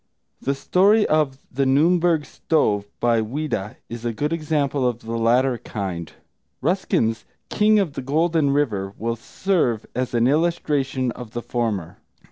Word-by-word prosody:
The 140 Hz, -, 0 dB
story 200 Hz, +9 st, +3 dB
of 150 Hz, -4 st, +1 dB
The 135 Hz, +2 st, 0 dB
Nürnberg 165 Hz, +3 st, +3 dB
Stove, 105 Hz, -9 st, 0 dB
by 115 Hz, -1 st, +2 dB
Ouida, 110 Hz, -4 st, -3 dB
is 115 Hz, 0 st, -7 dB
a 120 Hz, -, -1 dB
good 150 Hz, +8 st, -2 dB
example 145 Hz, -4 st, 0 dB
of 120 Hz, -1 st, -6 dB
the 115 Hz, +1 st, -5 dB
latter 120 Hz, +2 st, +2 dB
kind; 85 Hz, -6 st, -5 dB, 0.5 s
Ruskin's 160 Hz, -, 0 dB, 0.3 s
King 215 Hz, 0 st, +4 dB
of 190 Hz, -8 st, +1 dB
the -, -, -4 dB
Golden 155 Hz, +2 st, +1 dB
River 105 Hz, -9 st, 0 dB
will 115 Hz, +1 st, -2 dB
serve 120 Hz, -, -1 dB
as 125 Hz, 0 st, -2 dB
an 115 Hz, 0 st, +3 dB
illustration 140 Hz, -4 st, +1 dB
of 120 Hz, -2 st, -9 dB
the 120 Hz, -, -4 dB
former. 110 Hz, -9 st, -2 dB
130 Hz, 145 wpm, -22 LUFS, 115-155 Hz, 0.5 s, King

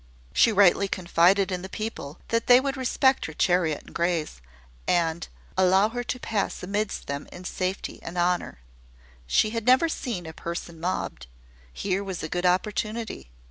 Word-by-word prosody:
She 230 Hz, -, +5 dB
rightly 200 Hz, -1 st, +5 dB
confided 185 Hz, +1 st, +3 dB
in 180 Hz, -1 st, -2 dB
the 190 Hz, -, -7 dB
people, 215 Hz, -10 st, -5 dB
that 230 Hz, 0 st, 0 dB
they 245 Hz, 0 st, +8 dB
would 275 Hz, +1 st, -2 dB
respect 265 Hz, 0 st, +2 dB
her 160 Hz, -, -8 dB
chariot 170 Hz, -2 st, +1 dB
and -, -, -15 dB
greys, 170 Hz, -, -1 dB, 0.5 s
and 170 Hz, -1 st, +1 dB, 0.3 s
allow 190 Hz, +3 st, +4 dB
her 245 Hz, +1 st, -4 dB
to 250 Hz, -, -4 dB
pass 215 Hz, -6 st, -2 dB
amidst 205 Hz, +2 st, -2 dB
them 140 Hz, +1 st, -5 dB
in 180 Hz, -, -10 dB
safety 185 Hz, +1 st, -3 dB
and 170 Hz, +2 st, -7 dB
honour. 175 Hz, -, 0 dB, 0.7 s
She 215 Hz, -, +3 dB
had 230 Hz, 0 st, -4 dB
never 260 Hz, +6 st, +6 dB
seen 230 Hz, -, -4 dB
a 160 Hz, -, -7 dB
person 170 Hz, 0 st, -6 dB
mobbed. 165 Hz, -, -3 dB, 0.4 s
Here 195 Hz, -, -2 dB
was 190 Hz, -4 st, -5 dB
a 160 Hz, -, -4 dB
good 180 Hz, +2 st, 0 dB
opportunity. 215 Hz, -, -1 dB
185 Hz, 165 wpm, -26 LUFS, 170-215 Hz, 0.7 s, they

